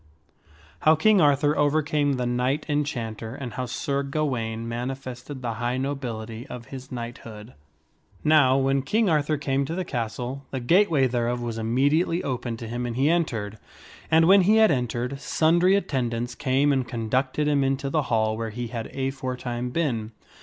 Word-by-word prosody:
How 155 Hz, +1 st, +5 dB
King 205 Hz, +4 st, +4 dB
Arthur 145 Hz, 0 st, +3 dB
Overcame 145 Hz, -1 st, +1 dB
the 125 Hz, -2 st, -2 dB
Knight 125 Hz, +4 st, 0 dB
Enchanter, 120 Hz, -7 st, -3 dB
and 125 Hz, -5 st, -6 dB
How 130 Hz, -1 st, -3 dB
Sir 140 Hz, +3 st, -2 dB
Gawaine 125 Hz, -6 st, -2 dB
Manifested 130 Hz, +2 st, -6 dB
the 115 Hz, -2 st, -2 dB
High 120 Hz, +1 st, 0 dB
Nobility 120 Hz, -4 st, -4 dB
of 125 Hz, -1 st, -8 dB
His 130 Hz, 0 st, -8 dB
Knighthood. 115 Hz, -2 st, -8 dB, 0.7 s
NOW, 150 Hz, -4 st, +5 dB
when 135 Hz, 0 st, +2 dB
King 205 Hz, -, +1 dB
Arthur 150 Hz, 0 st, +1 dB
came 140 Hz, -1 st, 0 dB
to 160 Hz, -, -4 dB
the 185 Hz, 0 st, -2 dB
castle, 125 Hz, +1 st, -4 dB
the 130 Hz, -, -3 dB
gateway 160 Hz, +1 st, +3 dB
thereof 120 Hz, -1 st, 0 dB
was 115 Hz, -2 st, -4 dB
immediately 145 Hz, +10 st, +1 dB
opened 120 Hz, -3 st, -3 dB
to 115 Hz, -, -7 dB
him 120 Hz, +2 st, -3 dB
and 120 Hz, -, -4 dB
he 140 Hz, +5 st, +3 dB
entered. 110 Hz, -11 st, -1 dB, 0.5 s
And 160 Hz, 0 st, +5 dB
when 195 Hz, +1 st, +7 dB
he 205 Hz, +4 st, +4 dB
had 220 Hz, -1 st, +6 dB
entered, 125 Hz, 0 st, -2 dB
sundry 170 Hz, +5 st, +3 dB
attendants 120 Hz, -9 st, -1 dB
came 140 Hz, +2 st, +2 dB
and 130 Hz, -2 st, 0 dB
conducted 130 Hz, +5 st, -1 dB
him 145 Hz, -2 st, +2 dB
into 135 Hz, +1 st, -1 dB
the 155 Hz, -, +2 dB
hall 110 Hz, -1 st, +2 dB
where 115 Hz, 0 st, -3 dB
he 120 Hz, +2 st, -5 dB
had 115 Hz, -2 st, -5 dB
aforetime 130 Hz, -2 st, -3 dB
been. 120 Hz, -7 st, -2 dB
130 Hz, 165 wpm, -25 LUFS, 120-145 Hz, 0.7 s, when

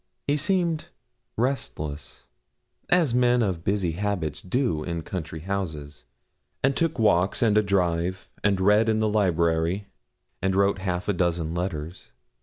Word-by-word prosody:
He 145 Hz, -, +2 dB
seemed 170 Hz, 0 st, +1 dB, 0.5 s
restless, 80 Hz, -, -3 dB, 0.6 s
as 170 Hz, -8 st, +3 dB
men 125 Hz, -1 st, +3 dB
of 90 Hz, -5 st, -2 dB
busy 95 Hz, -3 st, 0 dB
habits 85 Hz, -5 st, -2 dB
do 90 Hz, -, 0 dB
in 85 Hz, -1 st, -4 dB
country 80 Hz, -3 st, -5 dB
houses, 80 Hz, -8 st, -5 dB, 0.6 s
and 135 Hz, 0 st, +3 dB
took 165 Hz, -3 st, 0 dB
walks, 100 Hz, -2 st, +3 dB
and 110 Hz, -3 st, +3 dB
a 105 Hz, -, +6 dB
drive, 90 Hz, -2 st, 0 dB, 0.2 s
and 100 Hz, -2 st, +2 dB
read 105 Hz, +4 st, +4 dB
in 110 Hz, -, +2 dB
the 110 Hz, 0 st, +2 dB
library, 90 Hz, -1 st, +1 dB, 0.5 s
and 95 Hz, 0 st, +1 dB
wrote 100 Hz, 0 st, +2 dB
half 90 Hz, -1 st, -2 dB
a 105 Hz, -, +2 dB
dozen 85 Hz, -3 st, 0 dB
letters. 85 Hz, -1 st, -4 dB
95 Hz, 140 wpm, -25 LUFS, 85-110 Hz, 0.6 s, a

